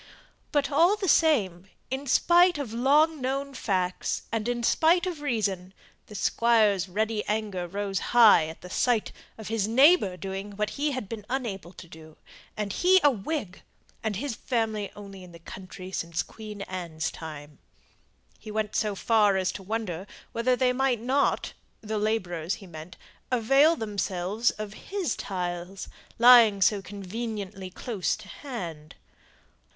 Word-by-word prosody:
But 290 Hz, 0 st, +1 dB
all 340 Hz, +8 st, +4 dB
the 405 Hz, -2 st, -3 dB
same 200 Hz, -, +2 dB, 0.2 s
in 270 Hz, +2 st, -3 dB
spite 350 Hz, +5 st, +4 dB
of 265 Hz, -7 st, -5 dB
long 290 Hz, +5 st, +3 dB
known 275 Hz, +2 st, -2 dB
facts, 185 Hz, -7 st, -2 dB
and 225 Hz, 0 st, -2 dB
in 240 Hz, -1 st, -2 dB
spite 335 Hz, +8 st, +3 dB
of 345 Hz, -5 st, -4 dB
reason 200 Hz, -8 st, -2 dB, 0.3 s
the 210 Hz, -, -11 dB
Squire's 210 Hz, -3 st, +2 dB
ready 215 Hz, +2 st, -1 dB
anger 205 Hz, -4 st, -2 dB
rose 195 Hz, +1 st, -3 dB
high 225 Hz, -9 st, +5 dB
at 160 Hz, -, -10 dB
the 180 Hz, -, -10 dB
sight 240 Hz, 0 st, +1 dB, 0.3 s
of 220 Hz, -2 st, -8 dB
his 220 Hz, -3 st, 0 dB
neighbour 255 Hz, -, +5 dB
doing 195 Hz, +2 st, -6 dB
what 210 Hz, 0 st, -1 dB
he 295 Hz, +1 st, -1 dB
had 255 Hz, -7 st, -4 dB
been 220 Hz, 0 st, -7 dB
unable 215 Hz, -9 st, -4 dB
to 180 Hz, -, -12 dB
do, 160 Hz, -1 st, -14 dB, 0.4 s
and 205 Hz, -2 st, -3 dB
he 375 Hz, +1 st, +5 dB
a 290 Hz, -, +6 dB
Whig, 215 Hz, -, -4 dB, 0.4 s
and 220 Hz, -2 st, -2 dB
his 265 Hz, +6 st, -3 dB
family 220 Hz, -4 st, -2 dB
only 195 Hz, -2 st, -10 dB
in 180 Hz, -1 st, -13 dB
the -, -, -10 dB
county 185 Hz, +2 st, -10 dB
since 170 Hz, -2 st, -2 dB
Queen 210 Hz, -2 st, -9 dB
Anne's 170 Hz, -4 st, -4 dB
time. 150 Hz, -2 st, -9 dB, 0.8 s
He 215 Hz, -, -11 dB
went 215 Hz, 0 st, -2 dB
so 210 Hz, -2 st, 0 dB
far 210 Hz, -2 st, +3 dB
as 190 Hz, 0 st, 0 dB
to 195 Hz, -, -8 dB
wonder 195 Hz, -3 st, -4 dB, 0.2 s
whether 240 Hz, +2 st, +1 dB
they 250 Hz, 0 st, +2 dB
might 260 Hz, -2 st, +1 dB
not 260 Hz, +5 st, 0 dB, 0.3 s
the 215 Hz, 0 st, -3 dB
labourers 185 Hz, -5 st, -1 dB
he 195 Hz, -, -13 dB
meant 165 Hz, 0 st, -10 dB, 0.3 s
avail 270 Hz, +7 st, +4 dB
themselves 205 Hz, -, -1 dB
of 215 Hz, -1 st, -6 dB, 0.2 s
his 380 Hz, -, -1 dB
tiles, 180 Hz, 0 st, -5 dB, 0.3 s
lying 235 Hz, -4 st, +7 dB
so 195 Hz, +2 st, +3 dB
conveniently 200 Hz, 0 st, -6 dB
close 195 Hz, 0 st, -2 dB
to -, -, -13 dB
hand. 170 Hz, -, -7 dB
210 Hz, 155 wpm, -27 LUFS, 185-250 Hz, 0.8 s, lying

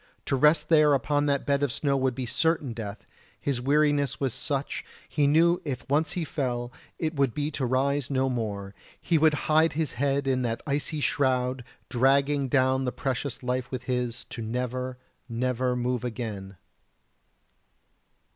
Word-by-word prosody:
To -, -, +1 dB
rest 150 Hz, +3 st, +4 dB
there 150 Hz, -3 st, +6 dB
upon 145 Hz, +1 st, +1 dB
that 140 Hz, -1 st, +1 dB
bed 140 Hz, 0 st, +1 dB
of 145 Hz, -3 st, +1 dB
snow 140 Hz, +1 st, 0 dB
would 130 Hz, -2 st, +1 dB
be 130 Hz, -1 st, -3 dB
certain 155 Hz, 0 st, 0 dB
death; 105 Hz, -3 st, -7 dB, 0.3 s
his 135 Hz, -4 st, -1 dB
weariness 145 Hz, 0 st, +2 dB
was 135 Hz, -4 st, 0 dB
such, 140 Hz, -1 st, -3 dB, 0.2 s
he 145 Hz, -2 st, +1 dB
knew 170 Hz, +4 st, +4 dB
if 135 Hz, -5 st, -5 dB
once 150 Hz, +4 st, +1 dB
he 175 Hz, -3 st, -2 dB
fell 120 Hz, -5 st, -2 dB, 0.3 s
it 160 Hz, -1 st, -1 dB
would 140 Hz, -5 st, +1 dB
be 150 Hz, +1 st, -1 dB
to 135 Hz, -4 st, -2 dB
rise 135 Hz, +2 st, +1 dB
no 135 Hz, -1 st, +1 dB
more 105 Hz, -6 st, -3 dB, 0.3 s
he 165 Hz, -3 st, +1 dB
would 155 Hz, -1 st, +4 dB
hide 160 Hz, +1 st, +4 dB
his 155 Hz, -2 st, -1 dB
head 140 Hz, +2 st, 0 dB
in 130 Hz, -1 st, +1 dB
that 115 Hz, -2 st, -2 dB
icy 150 Hz, +1 st, -1 dB
shroud 130 Hz, -2 st, +1 dB, 0.2 s
dragging 140 Hz, +2 st, +2 dB
down 130 Hz, 0 st, +2 dB
the 125 Hz, -, 0 dB
precious 130 Hz, 0 st, -3 dB
life 125 Hz, 0 st, -1 dB
with 130 Hz, -2 st, -5 dB
his, 125 Hz, -1 st, -2 dB
to 115 Hz, -, -5 dB
never, 125 Hz, +2 st, -3 dB, 0.3 s
never 125 Hz, +1 st, 0 dB
move 125 Hz, 0 st, -1 dB
again. 105 Hz, -5 st, -5 dB
135 Hz, 165 wpm, -27 LUFS, 125-145 Hz, 0.3 s, there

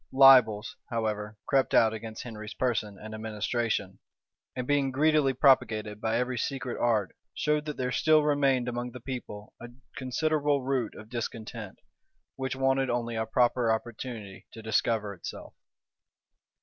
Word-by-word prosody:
Libels, 125 Hz, -6 st, +6 dB
however, 110 Hz, -2 st, -2 dB
crept 135 Hz, -1 st, +2 dB
out 110 Hz, -1 st, +5 dB
against 110 Hz, 0 st, -7 dB
Henry's 110 Hz, -3 st, -8 dB
person 110 Hz, -5 st, -1 dB
and 110 Hz, +3 st, -9 dB
administration; 110 Hz, -2 st, -2 dB, 0.6 s
and 125 Hz, -, -3 dB
being 140 Hz, 0 st, +2 dB
greedily 150 Hz, 0 st, +3 dB
propagated 110 Hz, -6 st, +2 dB
by 115 Hz, 0 st, +1 dB
every 125 Hz, 0 st, -1 dB
secret 130 Hz, -2 st, -3 dB
art, 110 Hz, -5 st, +1 dB, 0.2 s
showed 150 Hz, 0 st, 0 dB
that 150 Hz, -1 st, -5 dB
there 125 Hz, -1 st, -1 dB
still 155 Hz, +4 st, +4 dB
remained 140 Hz, -4 st, +2 dB
among 120 Hz, 0 st, -3 dB
the 125 Hz, -, -8 dB
people 115 Hz, -5 st, -7 dB
a 120 Hz, -, -8 dB, 0.3 s
considerable 145 Hz, +1 st, 0 dB
root 130 Hz, -4 st, -1 dB
of 105 Hz, -, -11 dB
discontent, 115 Hz, -3 st, -5 dB, 0.6 s
which 130 Hz, 0 st, -3 dB
wanted 135 Hz, 0 st, +1 dB
only 120 Hz, -1 st, -1 dB
a 110 Hz, 0 st, -2 dB
proper 120 Hz, 0 st, +2 dB
opportunity 110 Hz, -3 st, -5 dB
to 110 Hz, -, -11 dB
discover 110 Hz, -1 st, 0 dB
itself. 90 Hz, -, -9 dB
120 Hz, 140 wpm, -28 LUFS, 110-135 Hz, 0.6 s, Libels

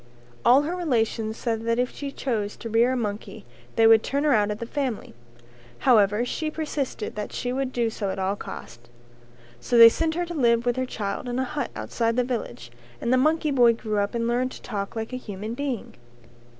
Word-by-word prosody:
All 265 Hz, +4 st, +6 dB
her 335 Hz, +4 st, -2 dB
relations 225 Hz, -9 st, -1 dB
said 225 Hz, -2 st, -2 dB
that 230 Hz, 0 st, +1 dB
if 250 Hz, 0 st, 0 dB
she 280 Hz, -1 st, -5 dB
chose 215 Hz, -7 st, -2 dB
to 230 Hz, -, -7 dB
rear 235 Hz, +3 st, +3 dB
a -, -, -1 dB
monkey 205 Hz, -, -5 dB, 0.3 s
they 225 Hz, -, +4 dB
would 225 Hz, -1 st, +7 dB
turn 280 Hz, +4 st, -1 dB
her 300 Hz, -2 st, +4 dB
out 210 Hz, -3 st, +3 dB
of 210 Hz, -, -2 dB
the 235 Hz, -, -5 dB
family. 260 Hz, -2 st, -3 dB, 0.6 s
However 215 Hz, -2 st, +4 dB
she 310 Hz, +5 st, -2 dB
persisted 300 Hz, -7 st, -3 dB
that 210 Hz, 0 st, -5 dB
she 245 Hz, 0 st, -3 dB
would 265 Hz, 0 st, -2 dB
do 235 Hz, -3 st, 0 dB
so 205 Hz, -3 st, -3 dB
at 190 Hz, -, -3 dB
all 190 Hz, +1 st, 0 dB
costs. 120 Hz, -10 st, -10 dB, 0.7 s
So 235 Hz, -, 0 dB
they 230 Hz, 0 st, +11 dB
sent 320 Hz, +6 st, -1 dB
her 350 Hz, +1 st, -1 dB
to 345 Hz, -, -6 dB
live 235 Hz, -5 st, +2 dB
with 245 Hz, -1 st, +1 dB
her 255 Hz, 0 st, -2 dB
child 205 Hz, +1 st, -4 dB
in 240 Hz, -, -2 dB
a 260 Hz, -, +1 dB
hut 290 Hz, +3 st, -3 dB
outside 230 Hz, -1 st, -1 dB
the 250 Hz, -, +2 dB
village, 120 Hz, -, -5 dB, 0.3 s
and 235 Hz, -, 0 dB
the -, -, +5 dB
monkey 310 Hz, +3 st, +2 dB
boy 240 Hz, -4 st, +5 dB
grew 215 Hz, -2 st, -2 dB
up 200 Hz, +3 st, -1 dB
and 230 Hz, 0 st, 0 dB
learned 245 Hz, +2 st, +1 dB
to -, -, -11 dB
talk 200 Hz, -2 st, -4 dB
like 225 Hz, +2 st, -4 dB
a -, -, -2 dB
human 215 Hz, -2 st, -6 dB
being. 265 Hz, -3 st, -4 dB
235 Hz, 215 wpm, -25 LUFS, 215-260 Hz, 0.7 s, they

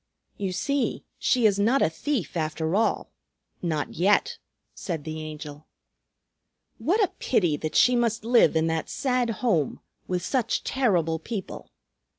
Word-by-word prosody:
"You 195 Hz, -2 st, -3 dB
see, 280 Hz, +9 st, -1 dB, 0.2 s
she 245 Hz, -3 st, +2 dB
is 205 Hz, -2 st, +4 dB
not 235 Hz, +7 st, +3 dB
a -, -, +4 dB
thief, 200 Hz, -, -3 dB
after 160 Hz, +1 st, -1 dB
all; 225 Hz, +2 st, 0 dB, 0.5 s
not 155 Hz, -4 st, -2 dB
yet," 195 Hz, +5 st, +2 dB, 0.3 s
said 165 Hz, -5 st, -5 dB
the 155 Hz, 0 st, -5 dB
Angel. 150 Hz, -1 st, -8 dB, 1.1 s
"What 410 Hz, +7 st, +2 dB
a 390 Hz, -, 0 dB
pity 175 Hz, -, +2 dB
that 155 Hz, 0 st, -4 dB
she 250 Hz, 0 st, +5 dB
must 230 Hz, -2 st, 0 dB
live 235 Hz, -7 st, +5 dB
in 160 Hz, 0 st, +2 dB
that 160 Hz, -1 st, -1 dB
sad 250 Hz, -3 st, 0 dB, 0.2 s
home, 165 Hz, -, +1 dB, 0.3 s
with 180 Hz, -1 st, -2 dB
such 245 Hz, -4 st, 0 dB
terrible 175 Hz, -, +1 dB
people! 200 Hz, +2 st, -6 dB
190 Hz, 145 wpm, -26 LUFS, 160-240 Hz, 1.1 s, she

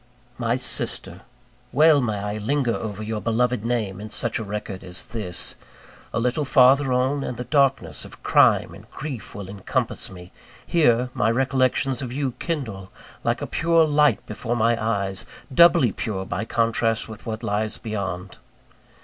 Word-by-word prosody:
My 120 Hz, 0 st, +1 dB
sister! 95 Hz, -7 st, -3 dB, 0.5 s
well 150 Hz, +1 st, +5 dB
may 110 Hz, -4 st, -1 dB
I 105 Hz, +1 st, -3 dB
linger 125 Hz, +2 st, 0 dB
over 110 Hz, -2 st, -4 dB
your 110 Hz, 0 st, -3 dB
beloved 120 Hz, 0 st, +1 dB
name 110 Hz, -5 st, -2 dB
in 110 Hz, -, -7 dB
such 120 Hz, +2 st, -1 dB
a -, -, -3 dB
record 100 Hz, -2 st, -5 dB
as 90 Hz, 0 st, -4 dB
this. 105 Hz, -6 st, -3 dB, 0.6 s
A 115 Hz, -, -1 dB
little 125 Hz, +5 st, 0 dB
farther 135 Hz, 0 st, +5 dB
on, 130 Hz, +3 st, +1 dB
and 125 Hz, -, -4 dB
the 125 Hz, -, -3 dB
darkness 140 Hz, 0 st, +1 dB
of -, -, -13 dB
crime -, -, +4 dB
and -, -, -14 dB
grief 135 Hz, -5 st, -7 dB
will 100 Hz, -2 st, -6 dB
encompass 100 Hz, -1 st, -2 dB
me; 90 Hz, -1 st, -12 dB, 0.3 s
here, 125 Hz, -6 st, +3 dB
my -, -, +2 dB
recollections 130 Hz, +1 st, +1 dB
of 125 Hz, -3 st, -4 dB
you 135 Hz, 0 st, -1 dB
kindle 110 Hz, -, -4 dB, 0.3 s
like -, -, 0 dB
a -, -, -1 dB
pure 165 Hz, -1 st, +3 dB
light 150 Hz, -1 st, +3 dB
before 120 Hz, -1 st, -3 dB
my 115 Hz, 0 st, +3 dB
eyes 100 Hz, -3 st, -1 dB, 0.3 s
doubly 170 Hz, -5 st, +6 dB
pure 95 Hz, -1 st, -3 dB
by 95 Hz, +3 st, -3 dB
contrast 115 Hz, -1 st, +1 dB
with 110 Hz, +1 st, -10 dB
what 110 Hz, +1 st, -4 dB
lies 105 Hz, 0 st, -1 dB
beyond. 95 Hz, -4 st, -5 dB
115 Hz, 160 wpm, -24 LUFS, 105-130 Hz, 0.6 s, doubly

